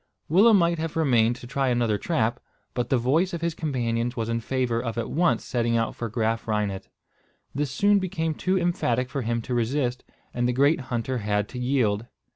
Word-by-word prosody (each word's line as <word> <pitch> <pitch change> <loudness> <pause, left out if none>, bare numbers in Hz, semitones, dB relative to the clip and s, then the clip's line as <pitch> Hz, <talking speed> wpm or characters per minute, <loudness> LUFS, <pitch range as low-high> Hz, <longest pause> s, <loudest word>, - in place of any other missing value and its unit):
Willem 205 +7 +6
might 170 -2 +2
have 160 -1 -3
remained 120 -7 +3
to 125 - -11
try 135 +2 -1
another 120 -4 +1
trap, 120 -8 0 0.3
but 125 -1 -2
the 130 - +3
voice 160 +10 +1
of 165 - -6
his 170 -1 0
companions 120 -6 -2
was 115 0 -2
in 115 0 0
favour 120 -1 -1
of 115 -1 -4
at 115 - -3
once 170 +2 +1
setting 115 -2 0
out 115 -1 -1
for 115 - -4
Graaf 115 0 -1
Reinet. 105 -3 -2 0.6
This 145 +1 -1
soon 205 +9 +3
became 170 -4 -2
too 185 +5 0
emphatic 130 -8 0
for 140 - -2
him 115 0 -1
to 125 - -4
resist, 125 +1 0 0.3
and 120 0 0
the 125 - +1
great 140 +5 +3
hunter 120 +1 -1
had 105 -1 0
to 125 - -6
yield. 120 -4 0
125 Hz, 200 wpm, -25 LUFS, 115-155 Hz, 0.6 s, Willem